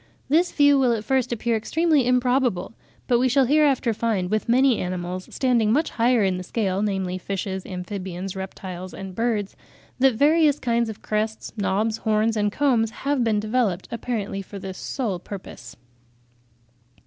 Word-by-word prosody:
This 335 +5 +3
view 285 -1 +4
will 250 -3 +3
at 220 -2 -3
first 260 +2 0
appear 235 0 0
extremely 300 +3 +1
improbable; 250 -6 +1 0.3
but 240 -2 +2
we 255 +1 +3
shall 270 +1 +4
hereafter 275 -4 +3
find 210 -5 -1
with 215 +1 -1
many 255 0 +4
animals 180 0 -4
standing 240 -5 +1
much 300 +7 +1
higher 235 -1 +2
in 190 -2 +1
the 185 - -5
scale, 195 -1 -1
namely 190 -3 -1
fishes, 190 0 -4
amphibians, 185 0 -5
reptiles 185 -1 -7
and 195 -1 -7
birds, 220 -2 -1 0.4
that 260 -2 +4
various 300 +3 +4
kinds 235 -3 0
of 215 - -9
crests, 215 +1 -2
knobs, 215 +1 0
horns 220 +1 +1
and 205 -1 +1
combs 240 -4 +2 0.2
have 280 -3 +2
been 220 -2 +1
developed 215 -4 0
apparently 220 -4 -3
for 200 +1 -10
this 190 -1 -7
sole 220 -10 -3
purpose. 175 - -9
220 Hz, 160 wpm, -23 LUFS, 195-250 Hz, 0.4 s, view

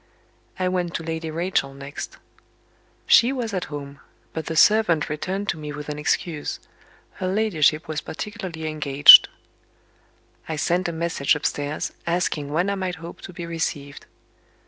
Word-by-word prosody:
I 185 - 0
went 180 -2 -2
to 165 - -3
Lady 160 0 -4
Rachel 160 -4 -1
next. 140 +1 -8 0.9
She 240 +3 +5
was 240 -5 -3
at 185 -2 -2
home, 140 -1 -8 0.3
but 160 -1 -5
the 160 - -3
servant 175 -3 +4
returned 190 +7 -3
to 160 - -2
me 150 -1 -6
with 150 0 -7
an 150 0 -5
excuse: 150 +1 -2 0.6
her 185 - -1
ladyship 175 -6 +1
was 155 -2 -3
particularly 170 -3 -6
engaged. 145 -2 +8 1.2
I 160 - -2
sent 175 +4 0
a - - -2
message 165 -4 0
upstairs, 145 0 -3
asking 165 -4 -1
when 175 +6 +1
I - - -1
might 180 -1 -2
hope 170 0 -10
to - - -9
be 170 -1 -7
received. 150 -4 -4
160 Hz, 150 wpm, -23 LUFS, 150-180 Hz, 1.2 s, engaged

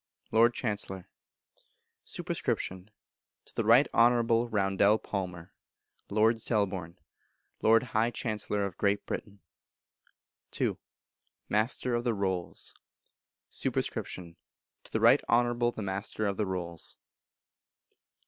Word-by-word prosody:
Lord 115 +2 +5
Chancellor. 100 -5 -3 1.0
Sup. - - -5
To 95 0 -2 0.7
the 115 - -1
Right 115 +6 +6
Honourable 120 0 +4
Roundell 100 0 +3
Palmer, 90 -4 -5 0.6
Lord 110 +2 +3
Selborne, 95 -6 -1 0.6
Lord 115 +1 +5
High 115 -2 +1
Chancellor 105 -3 -2
of 95 -3 -7
Great 100 0 +1
Britain. 100 -2 -6 1.2
ii. - - +1 0.7
Master 115 +3 0
of 120 0 0
the 120 -2 0
Rolls. 95 -3 -3 0.8
Sup. - - -2
To 85 -2 -3 0.6
the - - 0
Right - - +6
Honourable 120 0 +3
the 110 - -6
Master 100 +2 -2
of 100 -1 0
the 105 0 -1
Rolls. 85 -3 -5
105 Hz, 105 wpm, -30 LUFS, 95-115 Hz, 1.2 s, Right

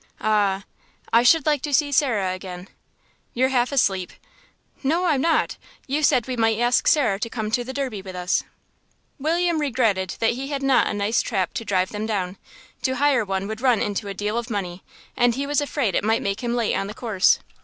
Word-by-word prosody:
"Ah.... 200 -2 +1 0.5
I 230 - +7
should 295 +5 +4
like 295 -3 +2
to 295 - -4
see 290 +1 +2
Sarah 225 -10 +1
again." 185 0 -8 0.7
"You're 260 +2 +2
half 250 -1 +1
asleep." 195 -9 +1 0.7
"No, 325 +6 +1
I'm 300 -6 +2
not; 325 0 +1 0.3
you 285 +3 -1
said 270 -6 +3
we 255 - -2
might 225 -2 +2
ask 240 +1 +2
Sarah 250 -12 +3
to 230 - -3
come 220 -2 -4
to 245 +2 +1
the 255 - -6
Derby 260 -7 -3
with 190 -1 -9
us." 180 0 0 0.8
William 335 +2 +1
regretted 220 -10 0
that 225 - +3
he 260 +3 -5
had 280 -1 -3
not 265 -3 +3
a - - -2
nice 205 +3 +1
trap 190 -6 -2
to 235 - -4
drive 185 -2 0
them 210 +1 -4
down. 190 -3 -2 0.4
To 260 -1 0
hire 275 -3 +3
one 195 -1 -3
would 220 +1 -6
run 250 -4 +3
into 205 0 -2
a 200 - -5
deal 210 +4 -1
of 240 +1 -7
money, 185 -4 -4 0.3
and 245 -1 +3
he 275 +2 -2
was 290 0 +1
afraid 280 -8 -1
it - - +1
might 225 +2 +1
make 200 +1 -2
him 240 0 -1
late 235 -3 0
on 195 - -1
the 210 - -8
course. 220 -6 +3
230 Hz, 210 wpm, -23 LUFS, 200-270 Hz, 0.8 s, I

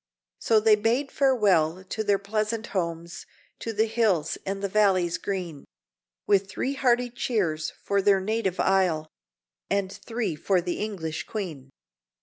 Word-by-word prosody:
So 225 -1 +3
they 215 0 +5
bade 230 +6 +1
farewell 190 - +2
to 220 +3 -4
their 205 -1 +3
pleasant 215 +3 -2
homes, 170 -2 -3 0.3
To 225 - -4
the 220 0 +2
hills 215 -9 +1
and 195 +1 -3
the - - +1
valleys 185 -4 +2
green, 180 -8 -4 0.6
With 195 -1 +2
three 265 +7 -2
hearty 250 -2 +2
cheers 185 -11 -1
for 200 0 +1
their 195 0 +4
native 195 -1 -1
isle, 175 -5 +2 0.6
And 195 -1 0
three 225 -8 -3
for 185 +4 +1
the 175 0 -3
English 175 -7 -4
Queen. 160 -11 -5
200 Hz, 140 wpm, -26 LUFS, 175-220 Hz, 0.6 s, they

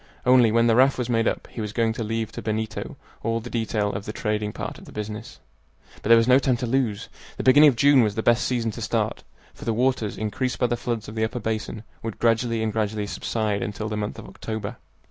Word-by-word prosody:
Only, 125 -3 +6
when 115 +1 +4
the 115 -1 +4
raft 130 +3 +5
was 125 -1 -2
made 115 -1 +2
up, - - -1
he 115 - -5
was 105 -1 -4
going 115 -1 +1
to 115 - -4
leave 115 0 -2
to - - -7
Benito 110 0 -3 0.2
all 115 0 0
the 120 +2 -9
detail 110 -3 -1
of 100 +1 -5
the - - -4
trading 105 -1 -2
part - - -6
of - - -14
the - - -12
business. 105 0 -6 0.6
But - - -4
there 115 - +9
was 115 +1 +3
no 130 +1 +6
time 130 -3 +1
to 125 - -3
lose. 115 -4 0 0.3
The - - -3
beginning 145 +4 +8
of 130 - 0
June 140 +2 +6
was 105 -3 +1
the 110 - -2
best 120 +1 +3
season 120 -3 0
to - - -8
start, - - -1 0.3
for - - -12
the 115 - -1
waters, 125 -3 0
increased 110 +4 -2
by 125 - +2
the 120 0 +1
floods 120 -2 -3
of 105 - -7
the 110 0 -1
upper 110 +2 -2
basin, 110 0 -3 0.2
would 115 -2 -5
gradually 115 0 +1
and 110 -1 -1
gradually 105 -1 -1
subside 105 0 -2
until 105 +1 -4
the 110 - -3
month 105 0 -3
of - - -9
October. 110 +1 -6
115 Hz, 245 wpm, -24 LUFS, 110-120 Hz, 0.6 s, there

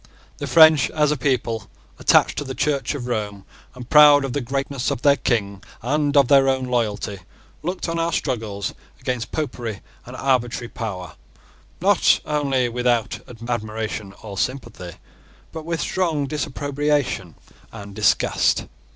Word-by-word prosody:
The - - -4
French, 155 -3 +6
as 150 -2 +1
a - - +1
people, 115 -6 -1 0.3
attached - - +4
to - - -3
the 130 -2 -6
Church 145 -1 0
of 130 -4 -5
Rome, 105 -5 -3 0.3
and 125 -1 -9
proud 145 -1 +7
of 130 - -4
the 145 - -1
greatness 135 +1 -2
of - - -3
their 140 -1 +6
King 100 -7 -1 0.2
and 145 +3 +1
of 140 -3 +6
their 135 0 +5
own 130 -1 0
loyalty, 110 -5 -2 0.4
looked 180 +4 -3
on 165 0 -2
our 165 0 0
struggles 110 - -2 0.3
against 125 -2 -3
Popery 120 -8 -4 0.3
and 125 - -8
arbitrary 120 -3 0
power, 95 -8 -6 0.7
not - - +4
only 140 -4 0
without 120 -1 0 0.3
admiration 110 -3 -4
or 100 -3 -6
sympathy, 105 -9 -4 0.5
but 160 -1 -7
with 165 -1 -2
strong 160 -4 0
disapprobation 145 - -2 0.4
and 100 0 -9
disgust. 105 0 +2
130 Hz, 140 wpm, -22 LUFS, 110-145 Hz, 0.7 s, proud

